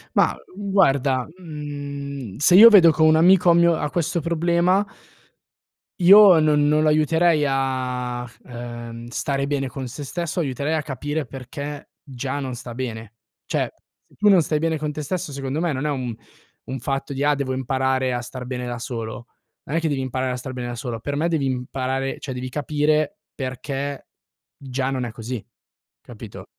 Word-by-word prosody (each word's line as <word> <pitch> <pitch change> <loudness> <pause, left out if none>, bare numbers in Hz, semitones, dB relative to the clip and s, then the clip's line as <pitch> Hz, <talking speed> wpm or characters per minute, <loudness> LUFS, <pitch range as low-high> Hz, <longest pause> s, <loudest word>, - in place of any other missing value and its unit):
Ma, - - +4 0.3
uhm, 200 -1 -4
guarda, 135 -9 +3
mhmm, 140 - -6
se 160 +5 +4
io 225 +5 +11
vedo 185 -7 +8
co 160 0 +1
un 155 0 +6
amico 180 +2 +5
ha - - +7
mio 170 0 +4
ha 150 - -2
questo 170 +1 -1
problema 170 +4 +2 1.1
io 190 -1 +8
non 150 -1 +3
non 150 +1 +3
lo 155 - +4
aiuterei 155 0 +3
a 125 -2 -2
f 120 - -20
ehm, 120 -1 -8
stare 140 +3 -2
bene 140 -2 -1
con 130 +1 -6
se 135 +5 -7
stesso, 170 +4 -3
aiuterei 140 +1 -2
a 160 - +1
capire 145 +1 -3
perché 140 +2 -8
già 135 +1 -4
non 130 -2 -4
sta 120 -1 -8
bene. 115 -4 -5 0.3
Cioè, - - -1 0.3
se - - -25
tu 210 - +1
non 195 -4 +7
stai 155 -1 0
bene 160 0 0
con 150 0 -3
te 150 - -5
stesso, 170 +2 -3
secondo 135 +2 -3
me, 170 -2 +1
non 140 +1 -3
è - - +1
un 130 -5 -2 0.5
un 130 +1 -5
fatto 135 +2 -3
di: 135 - -2
"Ah, 145 0 +4
devo 140 -2 -2
imparare 130 0 0
a 120 - -1
star 125 +1 -8
bene 125 0 -4
da 120 0 -4
solo." 115 0 -6 0.4
Non 155 - -1
è - - +3
che 165 - -1
devi 140 -3 -1
imparare 130 0 -2
a - - -2
star 130 +1 -6
bene 125 -1 -5
da 120 - -5
solo; 120 -1 -5
per 140 +5 -4
me 160 +4 0
devi 160 -5 0
imparare 130 +1 -2
cioè, 135 - -5
devi 125 0 -5
capire 150 +6 0
perché 135 +2 -5 0.5
già 130 -1 -3
non 130 -2 -2
è 120 - -5
così, 115 0 -6 0.6
capito? - - -10
140 Hz, 190 wpm, -22 LUFS, 130-155 Hz, 1.1 s, io